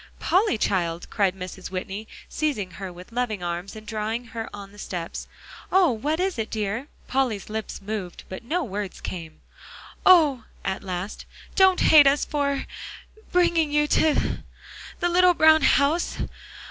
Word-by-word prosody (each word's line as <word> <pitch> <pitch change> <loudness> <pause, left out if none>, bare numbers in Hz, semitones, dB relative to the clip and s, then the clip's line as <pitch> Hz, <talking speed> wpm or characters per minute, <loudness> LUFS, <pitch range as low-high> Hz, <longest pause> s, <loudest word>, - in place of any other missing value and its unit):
"Polly, 380 - +2
child," 175 -5 -1
cried 195 -3 +1
Mrs. 185 0 -7
Whitney, 190 +3 -5 0.2
seizing 265 -12 -2
her 185 +2 -7
with 180 +4 -12
loving 230 -5 -2
arms 175 +4 -4
and 215 0 -10
drawing 220 +2 -3
her 225 -1 -4
on 200 -1 -9
the 205 - -15
steps 175 -4 -5 0.4
"oh! 370 -5 +5
what 290 +8 -1
is 375 -6 -1
it, 220 - -2
dear?" 220 +5 -2 0.2
Polly's 250 -7 -1
lips 220 0 -4
moved, 200 -4 -5
but 185 +4 -7
no 330 +9 -1
words 205 -5 -5
came. 165 -4 -7 0.6
"Oh!" 305 -10 +6 0.2
at 190 - -2
last, 185 +1 -5 0.3
"don't 380 -1 +5
hate 295 -3 +8
us 285 +1 +3
for 280 -2 -1 0.7
bringing 340 -4 +3
you 295 0 +3
to 315 -2 +2 0.6
the 350 - +1
little 360 0 +5
brown 315 0 +6
house. 285 +5 +2
220 Hz, 150 wpm, -25 LUFS, 195-305 Hz, 0.7 s, hate